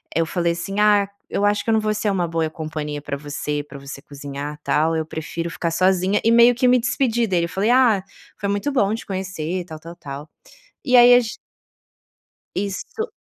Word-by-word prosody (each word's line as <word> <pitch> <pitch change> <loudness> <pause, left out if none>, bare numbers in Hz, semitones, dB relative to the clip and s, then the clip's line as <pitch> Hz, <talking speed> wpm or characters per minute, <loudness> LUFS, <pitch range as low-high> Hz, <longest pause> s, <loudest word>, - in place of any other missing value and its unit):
Eu 165 +1 +2
falei 170 0 0
assim: 195 +4 -4
"Ah, 205 -1 +4 0.2
eu 200 - -1
acho 205 0 +2
que - - -4
eu - - +3
não 220 - +4
vou 215 0 0
ser 210 -1 0
uma 180 -3 0
boa 165 -1 -1
companhia 155 -2 -5
para 140 -1 -4
você, 145 0 -4
para 140 -1 -11
você 140 0 -9
cozinhar 145 +1 -7
tal, 160 +2 +1
eu 160 -1 -1
prefiro 165 +2 -5
ficar 170 -1 -2
sozinha" 185 +3 +2
e 225 - +4
meio 235 +1 +7
que 250 +1 +2
me 250 0 +5
despedi 240 -1 +1
dele. 175 -4 +1
Eu - - -7
falei: 195 +5 0
"Ah, 240 -7 +4 0.3
foi 200 - -3
muito 205 +8 -1
bom 215 -7 +2
te - - -8
conhecer, 185 -2 -4
tal, 160 -3 -9
tal, 165 +2 -10
tal". 140 +2 -8 0.6
E 255 -2 +4
aí, 245 0 +9
a 245 - +6
g 225 - -5 1.2
Isso 205 - -4
185 Hz, 210 wpm, -21 LUFS, 155-215 Hz, 1.2 s, aí